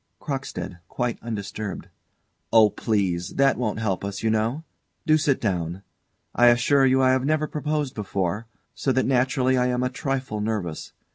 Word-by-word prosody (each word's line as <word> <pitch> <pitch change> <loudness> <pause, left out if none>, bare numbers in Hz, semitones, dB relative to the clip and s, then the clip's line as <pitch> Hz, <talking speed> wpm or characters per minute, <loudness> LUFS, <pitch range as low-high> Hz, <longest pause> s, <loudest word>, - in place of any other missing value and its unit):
CROCKSTEAD. 135 - -5
[Quite 120 +2 -3
undisturbed.] 105 -2 -5 0.6
Oh, 110 -2 +6
please! 95 -6 -1
That 135 0 +4
won't 110 -4 -2
help 100 -4 -1
us, 100 +1 -5
you 110 - +2
know. 115 +8 0 0.4
Do 155 - +5
sit 145 -3 +2
down. 90 -3 -2 0.5
I 120 - +5
assure 130 +3 +4
you 130 0 +3
I 130 - +5
have 130 0 +2
never 155 +2 +1
proposed 150 -2 -2
before, 100 +1 -2 0.3
so 135 - -1
that 130 - +2
naturally 130 0 +2
I 125 - +2
am 125 0 0
a 125 - +1
trifle 130 -5 -3
nervous. 105 -7 -3
120 Hz, 160 wpm, -24 LUFS, 105-135 Hz, 0.6 s, Oh